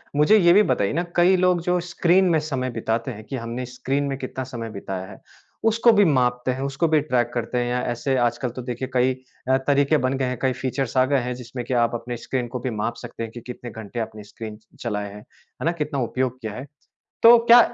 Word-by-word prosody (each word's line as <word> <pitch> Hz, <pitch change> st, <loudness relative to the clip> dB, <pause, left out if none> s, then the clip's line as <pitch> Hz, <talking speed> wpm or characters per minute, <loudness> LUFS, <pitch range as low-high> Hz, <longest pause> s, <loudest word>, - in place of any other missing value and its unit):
मुझे 150 Hz, +9 st, +5 dB
ये 175 Hz, -3 st, +6 dB
भी 210 Hz, +2 st, +6 dB
बताइए 100 Hz, +6 st, +1 dB
ना 170 Hz, +3 st, 0 dB
कई 180 Hz, +2 st, +5 dB
लोग 180 Hz, -1 st, +3 dB
जो 180 Hz, +1 st, +1 dB
स्क्रीन 175 Hz, +3 st, +3 dB
में -, -, +3 dB
समय 135 Hz, -4 st, -2 dB
बिताते 115 Hz, +3 st, -1 dB
हैं 110 Hz, -1 st, -9 dB
कि 135 Hz, -, -6 dB
हमने 120 Hz, +1 st, -4 dB
स्क्रीन 135 Hz, +3 st, -2 dB
में 135 Hz, -1 st, -2 dB
कितना 130 Hz, 0 st, -5 dB
समय 120 Hz, -3 st, -6 dB
बिताया 95 Hz, -2 st, -5 dB
है, -, -, -12 dB, 0.4 s
उसको 230 Hz, +1 st, +5 dB
भी 205 Hz, -2 st, +5 dB
मापते 125 Hz, -3 st, +2 dB
हैं। 130 Hz, +1 st, -4 dB
उसको 140 Hz, +4 st, 0 dB
भी 155 Hz, -2 st, +3 dB
ट्रैक 120 Hz, -4 st, 0 dB
करते 120 Hz, +1 st, -2 dB
हैं। 125 Hz, +1 st, -1 dB
ऐसे 125 Hz, +3 st, -1 dB
आजकल 120 Hz, +1 st, 0 dB
तो -, -, -3 dB
देखिए 125 Hz, +1 st, -4 dB
कई 130 Hz, +1 st, +3 dB, 0.4 s
अ, 130 Hz, -, +5 dB
तरीके 140 Hz, +2 st, +4 dB
बन 135 Hz, -, 0 dB
गए 130 Hz, -, 0 dB
हैं 125 Hz, -1 st, -2 dB
कई 130 Hz, -1 st, +2 dB
फ़ीचर्स 130 Hz, -1 st, -2 dB
आ 130 Hz, -, +5 dB
गए 140 Hz, 0 st, +2 dB
हैं 125 Hz, 0 st, -2 dB
जिसमें 120 Hz, +1 st, -6 dB
कि 130 Hz, -, -3 dB
आप 115 Hz, 0 st, 0 dB
अपने 120 Hz, +1 st, -5 dB
स्क्रीन 125 Hz, +1 st, -3 dB
को -, -, -1 dB
भी 125 Hz, -, -3 dB
माप 115 Hz, +2 st, -1 dB
सकते 115 Hz, -, -6 dB
हैं 115 Hz, -, -6 dB
कि 120 Hz, -, -9 dB
कितने 125 Hz, -1 st, -8 dB
घंटे 110 Hz, +2 st, -7 dB
आपने 110 Hz, -1 st, -5 dB
स्क्रीन 105 Hz, +1 st, -8 dB, 0.2 s
चलाया 105 Hz, -3 st, -3 dB
है। 100 Hz, +1 st, -10 dB
है 105 Hz, -, -12 dB
ना? 165 Hz, -, +3 dB
कितना 150 Hz, -4 st, -3 dB
उपयोग 130 Hz, +1 st, -2 dB
किया 110 Hz, -2 st, -5 dB
है। 130 Hz, -, -6 dB, 0.6 s
तो 235 Hz, +1 st, +10 dB
क्या 240 Hz, +1 st, +9 dB
130 Hz, 235 wpm, -23 LUFS, 120-145 Hz, 0.6 s, तो